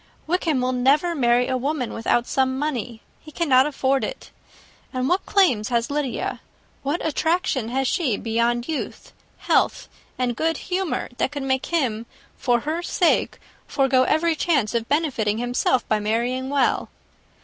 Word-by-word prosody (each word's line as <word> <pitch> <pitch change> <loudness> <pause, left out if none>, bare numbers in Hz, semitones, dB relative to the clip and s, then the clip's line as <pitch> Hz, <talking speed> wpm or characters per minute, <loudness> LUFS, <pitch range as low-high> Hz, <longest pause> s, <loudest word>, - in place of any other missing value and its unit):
Wickham 320 -5 0
will 255 0 +1
never 275 +7 +2
marry 245 -4 +2
a 260 -1 0
woman 265 -2 -2
without 235 +1 +1
some 260 0 0
money. 250 -6 -3 0.2
He 310 - -13
cannot 275 -5 +3
afford 275 -2 0
it. - - -6 0.6
And 255 -1 -1
what 360 +5 0
claims 255 - +3
has 235 +2 0
Lydia, 285 -4 -2 0.4
what 290 +5 -2
attractions 320 - 0
has 265 +1 0
she 255 - 0
beyond 235 +1 0
youth, 315 -3 -5 0.2
health, - - +1 0.3
and 250 -2 -1
good 325 +4 0
humour, 370 -2 -2
that - - +1
could 285 -2 -4
make 265 -1 -1
him 235 -9 -1 0.3
for 240 -2 +1
her 315 +5 -2
sake 350 0 +1 0.3
forego 270 -2 +2
every 320 +5 +2
chance 285 -11 +1
of 230 -1 -2
benefiting 260 -9 0
himself 245 +1 0
by 215 - +1
marrying 240 +5 -1
well? 280 -2 +1
265 Hz, 150 wpm, -23 LUFS, 240-310 Hz, 0.6 s, cannot